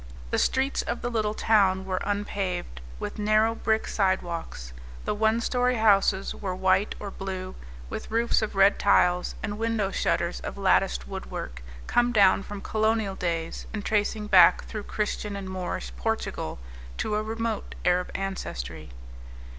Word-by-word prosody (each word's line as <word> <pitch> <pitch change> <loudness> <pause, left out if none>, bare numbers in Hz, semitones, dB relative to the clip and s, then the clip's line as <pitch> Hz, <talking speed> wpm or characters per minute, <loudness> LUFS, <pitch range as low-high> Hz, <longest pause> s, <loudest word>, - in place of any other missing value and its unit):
The - - +2
streets 265 +1 +1
of 235 - -4
the 245 - -1
little 215 -2 0
town 195 -4 +3
were 185 -1 -2
unpaved, 195 - -3 0.2
with - - -5
narrow 215 +2 +3
brick 220 -1 0
sidewalks. 170 - -2 0.3
The - - 0
one 220 +2 +2
story 250 +1 +1
houses 200 -3 +3
were 190 -3 -4
white 190 +2 +2
or 200 -1 -6
blue, 190 -1 -5 0.3
with - - -6
roofs 230 +1 +2
of 215 -2 -3
red 195 +1 +5
tiles 180 0 +3
and 205 0 -3
window 225 -3 0
shutters 170 -2 0
of - - -6
latticed 195 -1 +2
woodwork, 125 - -6 0.2
come 240 0 +2
down 200 -4 +5
from 205 0 -7
colonial 220 -2 0
days 165 -3 -3
and 210 -2 -4
tracing 210 0 0
back 185 -5 +6
through 215 -2 -6
Christian 210 -1 -3
and 195 -1 -5
Moorish 180 - -4
Portugal - - -3 0.4
to 215 - -2
a 210 - +1
remote 225 0 -3
Arab 180 0 +2
ancestry. 75 - -5
200 Hz, 150 wpm, -26 LUFS, 185-220 Hz, 0.4 s, back